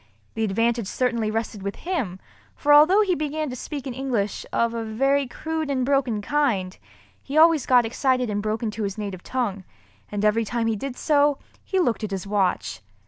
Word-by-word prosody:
The 225 - -2
advantage 230 +1 +1
certainly 235 -2 0
rested 220 -1 -3
with 200 +1 -4
him, 265 - -3 0.4
for 290 0 +3
although 320 +8 +7
he 390 -3 +2
began 305 -2 -2
to - - -5
speak 280 +2 -6
in 260 - -4
English, 240 -6 -2
of 235 0 +1
a 230 -1 -3
very 270 +5 +1
crude 315 +4 -4
and 260 -2 0
broken 255 -6 +1
kind, 215 -10 0 0.5
he 280 +3 -4
always 320 -2 +5
got 250 -2 +5
excited 255 +2 +1
and 205 -1 -2
broke 215 +3 -2
into 220 0 -3
his 200 -1 -3
native 200 -4 -5
tongue—and 205 -2 -5
every 220 +2 +3
time 230 +1 -2
he 225 -1 +1
did 255 +4 -5
so, 290 -2 +3 0.3
he 380 - -2
looked 240 -10 +1
at 215 - -2
his 195 -1 -4
watch. 190 - -1
235 Hz, 190 wpm, -24 LUFS, 210-280 Hz, 0.5 s, although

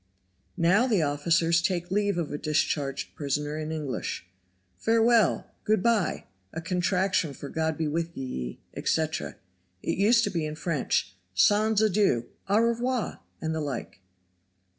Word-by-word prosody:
Now 185 +8 +4
the 210 -9 +2
officers 165 +3 +2
take 175 -1 -1
leave 205 -1 +1
of 165 -4 -2
a 145 - -2
discharged 145 -2 -1
prisoner 150 +1 -2
in 155 0 -4
English. 140 - -4 0.5
Farewell; 225 -2 +3
good 215 -3 +2
by! 230 -5 +1 0.3
a - - -5
contraction 180 -1 0
for 140 - -8
God 160 -1 -1
be 160 - 0
wi' 165 +2 -1
ye 65 - -5
etc. 160 -1 -1 0.5
It - - -1
used 230 +4 +5
to 205 - 0
be 170 -3 -1
in 155 0 -3
French, 155 - -1 0.2
Sans 210 - +4
adieu! 195 - +2 0.2
au 200 - +4
revoir! 235 +1 0 0.2
and 160 0 -1
the 160 - -2
like. 130 -8 -5
165 Hz, 140 wpm, -27 LUFS, 150-205 Hz, 0.5 s, used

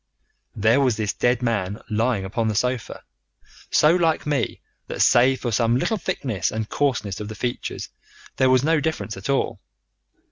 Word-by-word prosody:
"There 110 +5 +3
was 125 -5 +2
this 105 -2 -1
dead 125 0 +1
man 105 -3 -1
lying 110 -2 0
upon 110 +4 -1
the 110 - -1
sofa, 125 +2 -2 0.7
so 150 +2 +5
like 165 -3 +1
me 145 -2 -1 0.3
that - - -6
save 130 +2 +4
for 120 - -2
some 115 +1 +2
little 220 - 0
thickness 130 - -2
and 110 -1 -3
coarseness 120 -10 -1
of 105 - -5
the 110 - -7
features 120 +4 -4 0.5
there 130 - +4
was 130 0 +4
no 160 +1 +3
difference 145 -7 -3
at 95 +6 -7
all. 140 - 0
120 Hz, 170 wpm, -23 LUFS, 110-135 Hz, 0.7 s, so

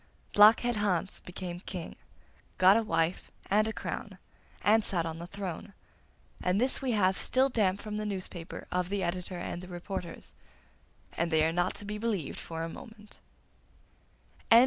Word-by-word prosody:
Blockhead 220 +3 +7
Hans 195 -3 0
became 180 -1 -6
King, 180 -2 -6 0.6
got 185 +2 +7
a 230 - +4
wife 175 -5 0 0.2
and 215 +2 +4
a - - 0
crown, - - -5 0.5
and 220 +1 +5
sat 175 -5 +1
on 165 0 -4
the 170 - -6
throne; 195 0 -6 0.7
and 180 +2 +2
this 255 +4 +1
we 260 -3 0
have 190 -3 +3
still 260 +6 +2
damp 200 -6 +2
from 210 -1 -4
the 215 - -2
newspaper 185 -4 -5
of 180 0 0
the 200 -1 -1
editor 180 +1 -3
and 175 0 -4
the 180 - -9
reporters 175 -1 -6 0.8
and 170 +1 0
they 160 -1 +4
are 165 - +1
not 175 +1 +1
to 205 - -8
be 210 +1 -4
believed 210 -9 -2
for 165 0 -5
a - - -2
moment. 215 +3 -12
190 Hz, 165 wpm, -30 LUFS, 175-210 Hz, 0.8 s, Blockhead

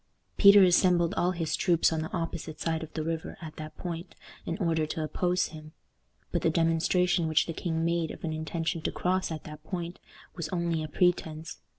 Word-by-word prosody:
Peter 200 -1 +8
assembled 175 -2 +4
all 175 - +1
his 170 -3 -1
troops 170 -2 +3
on 160 - -1
the 160 - -5
opposite 165 -2 -4
side 160 -1 -1
of 160 -1 -7
the 155 - -2
river 165 0 -4
at 160 -2 -9
that 155 0 -8
point 170 0 -6 0.3
in - - -2
order 165 -5 +1
to 155 +1 -3
oppose 180 +3 0
him. 155 -1 -11 0.6
But - - 0
the - - +3
demonstration 165 +2 +2
which 155 -1 +3
the 165 - -4
king 165 -1 -2
made 170 -1 0
of - - -9
an 160 -2 -2
intention 160 +1 -2
to - - -1
cross 185 +1 0
at 155 -2 -5
that 150 0 -10
point 175 0 -5 0.4
was 170 -3 -4
only 170 -2 -1
a 155 - -3
pretense. 160 -1 0
165 Hz, 200 wpm, -29 LUFS, 160-175 Hz, 0.6 s, Peter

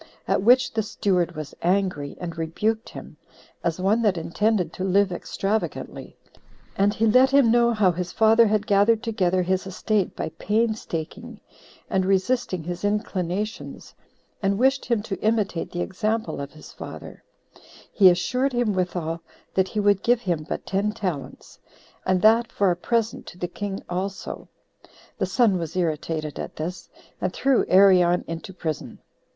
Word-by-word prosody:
At - - +2
which 250 +5 +4
the 220 - +1
steward 185 -5 0
was 155 -2 -7
angry, 180 -6 0
and 170 -2 -5
rebuked 210 +8 -2
him, - - -11 0.5
as 170 +1 -1
one 200 +5 +2
that 205 -5 +2
intended 180 +1 0
to 185 - -5
live 195 +1 +3
extravagantly; 195 +4 -3 0.6
and 200 +1 +3
he 220 +2 0
let 255 +4 +5
him 275 -4 +5
know 235 0 +4
how 210 -5 +3
his 180 +1 -4
father 225 +1 +5
had 210 0 +1
gathered 215 +2 +3
together 185 -5 +1
his 190 +1 -1
estate 195 +1 -1
by - - -3
painstaking, 215 -7 -2 0.5
and 190 -1 +1
resisting 190 -1 0
his 175 +2 -5
inclinations, 205 0 -3 0.5
and 195 0 +1
wished 265 +3 +2
him 230 -4 0
to 200 -3 -5
imitate 215 -5 0
the 175 - -3
example 215 -1 -2
of 140 0 -7
his 155 - -13
father: - - -10 0.7
he 195 -4 +7
assured 250 +10 0
him 240 -4 +1
withal, 175 -3 -2 0.3
that 190 0 +2
he 210 - -3
would 205 -1 +3
give 240 0 +2
him 170 -6 -1
but - - -4
ten 200 +2 0
talents, 185 -10 -5 0.5
and 185 0 +2
that 225 +1 +5
for 200 -2 +2
a - - 0
present 225 +5 -1
to - - -10
the 180 - -3
king 195 +2 -5
also. 190 +2 -5 0.7
The - - 0
son 215 -7 +2
was 165 -1 -5
irritated 155 -3 -2
at - - -6
this, 170 +3 -6 0.3
and 185 - 0
threw 265 +5 +2
Arion 180 -2 +5
into 165 +3 -6
prison. 160 -4 -5
195 Hz, 155 wpm, -24 LUFS, 175-220 Hz, 0.7 s, he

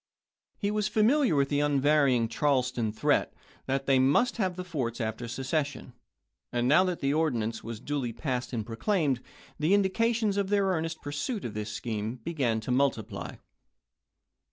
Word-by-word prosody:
He 205 -1 -1
was 210 0 0
familiar 220 - +3
with 140 -1 +2
the 145 - +1
unvarying 145 -4 +3
Charleston 125 -3 0
threat 110 - +1 0.3
that 135 0 -1
they 135 -1 +4
must 145 - +3
have 190 -5 0
the 180 - -5
forts 135 -10 -3
after 110 +1 -3
secession; 140 +4 -3 0.6
and 120 0 0
now 150 +7 +6
that 180 -2 -2
the 140 +1 +1
ordinance 120 -8 0
was 115 -1 -6
duly 140 -2 -2
passed 125 +1 -3
and 115 -4 -3
pro 115 0 -7
claimed, 150 - +1 0.4
the 160 +6 +4
indications 215 +1 +1
of 200 -1 0
their 200 -1 +3
earnest 165 -3 -2
pursuit 200 - -3
of 115 - -4
this 105 0 -4
scheme 110 +1 -3
began 125 -3 -1
to 120 - -4
multiply. 130 -4 -1
140 Hz, 160 wpm, -28 LUFS, 120-185 Hz, 0.6 s, now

